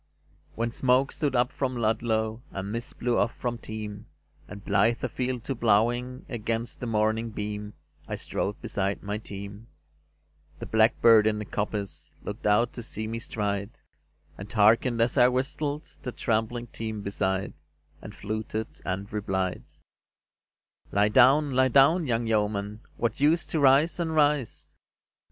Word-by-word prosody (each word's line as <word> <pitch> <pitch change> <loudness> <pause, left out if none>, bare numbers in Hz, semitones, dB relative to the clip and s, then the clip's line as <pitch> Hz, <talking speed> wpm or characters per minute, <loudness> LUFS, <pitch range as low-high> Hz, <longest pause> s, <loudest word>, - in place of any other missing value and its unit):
VII 75 +1 -37
When 115 +1 -1
smoke 130 +3 +2
stood 145 -4 -1
up 120 0 +2
from 130 -2 -2
Ludlow, 110 0 0
And 100 +1 -5
mist 115 +2 -5
blew 120 0 +1
off 120 - 0
from 120 -1 -3
Teme, 105 -1 -7 0.4
And 100 -1 -10
blithe 115 0 +2
afield 125 -2 -2
to 135 - -3
ploughing 120 +3 +1
Against 115 0 -3
the 125 - -4
morning 110 +1 +1
beam 105 -1 -5 0.3
I - - -3
strode 100 +1 -3
beside 100 -3 -2
my 105 +1 -3
team, 100 +1 -9 0.9
The - - -7
blackbird 110 0 +5
in 110 -1 +1
the 105 - -4
coppice 95 -8 -4
Looked 105 +1 -4
out 115 +4 +3
to 120 - -6
see 110 -1 -5
me 115 +1 -4
stride, 105 -4 -3 0.6
And 100 +1 -8
hearkened 115 +3 +4
as 115 +1 +2
I 125 - +7
whistled 140 +4 -1 0.2
The 125 - -4
tramping 115 +1 -1
team 110 -2 -6
beside, 95 -1 -1 0.5
And - - -10
fluted 110 +1 -5
and 100 +2 -4
replied: 95 -3 -2 1.3
"Lie 105 +1 +3
down, 135 +5 +5
lie 130 0 +4
down, 140 +6 +4
young 115 -1 0
yeoman; 105 -1 -1 0.2
What 115 0 -1
use 155 +3 +3
to 160 - -2
rise 140 +5 +4
and 160 -2 -1
rise? 145 -5 +1
115 Hz, 150 wpm, -27 LUFS, 105-125 Hz, 1.3 s, I